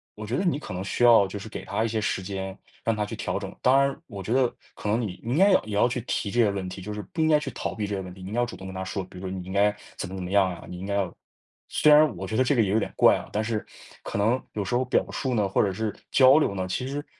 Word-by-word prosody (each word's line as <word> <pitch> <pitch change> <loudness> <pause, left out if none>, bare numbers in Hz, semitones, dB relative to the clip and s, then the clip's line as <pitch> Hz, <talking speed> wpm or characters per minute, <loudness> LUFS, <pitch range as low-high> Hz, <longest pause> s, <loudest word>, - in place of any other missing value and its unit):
我 105 - -7
觉 115 +4 -2
得 - - 0
你 170 -6 +1
可 145 - -7
能 90 - -3
需 100 +5 -1
要 115 -5 +7
就 100 +2 -6
是 100 - -8
给 110 - -7
他 105 +1 -1
一 115 - +1
些 110 -1 -1
时 95 - -1
间， 95 0 -5 0.3
让 115 - +1
他 105 -1 -1
去 - - -6
调 - - -2
整， - - -6
当 130 +2 +5
然 140 0 +2
我 100 -5 -7
觉 110 - -1
得 130 -2 +3 0.2
可 105 - -5
能 110 +3 +2
你， 100 -6 -4
你 115 - -3
应 145 - +1
该 195 +2 +6
要 185 - +4
也 105 -1 -4
要 105 - +4
去 125 0 -2
提 100 - -1
这 120 - 0
些 110 -3 +5
问 95 -2 -3
题， 95 +1 -7
就 105 - -6
是 105 - -5
不 165 - -1
应 160 - +3
该 155 -1 +5
去 150 - -5
逃 - - -4
避 105 - -2
这 100 - -4
些 95 - -3
问 90 -1 -8
题。 95 0 -12
你 95 - -6
应 - - -7
该 120 - 0
要 - - +2
主 120 - -8
动 95 - -10
跟 95 - -7
他 95 - -3
说， 95 +1 -3
比 90 0 -12
如 95 0 -5
你 95 -1 -5
应 95 - -8
该 105 +1 +3 0.2
怎 95 - -4
么 95 - -7
怎 95 - -5
么 90 - -5
样 100 -2 +4
啊， 85 - -9
你 90 - -8
应 95 - -6
该 100 0 -2
要 95 -3 -1 0.6
虽 150 -1 +5
然 155 +1 +6
我 95 - -5
觉 105 +4 -4
得 130 - +4
这 135 +2 +2
个 115 - +4
也 100 - -1
有 110 - +3
点 - - -3
怪 - - +6
啊， - - -6
但 105 - 0
是 110 -1 -2 0.4
可 - - -4
能 115 +6 +2
有 105 -2 -2
时 120 - -3
候 125 - +2
表 125 - +1
述 130 -2 -2
呢， 105 -3 +2
或 95 - +2
者 100 - +1
是 110 +2 -3 0.2
交 135 +2 +7
流 100 -10 0
呢， 95 0 -2
其 125 +7 -2
实 145 +2 -4
105 Hz, 375 characters per minute, -26 LUFS, 95-125 Hz, 0.6 s, 要